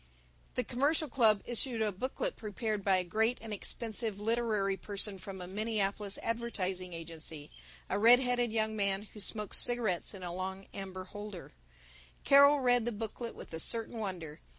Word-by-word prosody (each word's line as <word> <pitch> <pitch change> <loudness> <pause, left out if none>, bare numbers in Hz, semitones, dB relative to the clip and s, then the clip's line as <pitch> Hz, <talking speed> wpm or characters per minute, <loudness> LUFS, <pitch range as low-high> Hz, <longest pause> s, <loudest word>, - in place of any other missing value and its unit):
The 250 - +1
Commercial 290 +6 +1
Club 225 -5 +3
issued 240 0 +1
a 210 - +1
booklet 260 - -3
prepared 215 -1 -3
by 190 -1 +4
a 185 - +1
great 220 +6 +1
and 220 -1 -6
expensive 220 0 -1
literary 215 -3 +1
person 200 0 -2
from 190 0 -8
a 180 - -5
Minneapolis 205 0 -2
advertising 195 -6 -2
agency, 160 -2 -6 0.4
a 195 - -1
red 235 +3 +8
headed 245 -2 +1
young 220 -1 0
man 200 -1 +1
who 210 - -10
smoked 210 0 +1
cigarettes 230 -6 +2
in 190 - -9
a 175 -1 -4
long 190 +1 -5
amber 190 -1 -6
holder. 205 -1 -8 0.7
Carol 280 +1 +7
read 245 -2 +3
the 240 - 0
booklet 225 +2 -5
with - - -11
a 160 - -4
certain 230 +5 +1
wonder. 175 -7 -5
210 Hz, 165 wpm, -32 LUFS, 190-235 Hz, 0.7 s, red